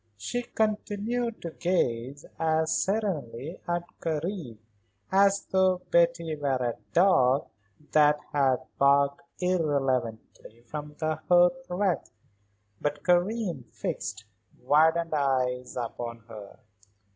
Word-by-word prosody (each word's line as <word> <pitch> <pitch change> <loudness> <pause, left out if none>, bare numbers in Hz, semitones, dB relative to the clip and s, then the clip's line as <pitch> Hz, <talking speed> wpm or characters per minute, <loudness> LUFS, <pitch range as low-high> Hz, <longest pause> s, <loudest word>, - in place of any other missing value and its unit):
She 245 - -3
continued 220 +1 -2
to 170 - -4
gaze 140 -6 -1
as 160 0 +1
serenely 165 - -2
at 175 0 -1 0.2
Karen 160 - -3 0.5
as 200 +1 +4
though 185 -1 +3
Betty 170 -2 +2
were 140 -3 0
a 125 -2 -1 0.2
dog 140 -7 +4 0.5
that 150 -1 +5
had 135 -3 +2 0.2
barked 140 0 +4 0.2
irrelevantly 135 -10 -1
from 150 +3 -7
the 155 -1 -1
hearth 180 +10 +4
rug. 185 0 +1 0.8
But 145 0 -2
Karen 180 - +1
fixed 105 - -5 0.3
widened 160 +5 +3
eyes 130 -3 0
upon 115 -1 -5
her. 105 -3 -11
155 Hz, 100 wpm, -27 LUFS, 130-180 Hz, 0.8 s, that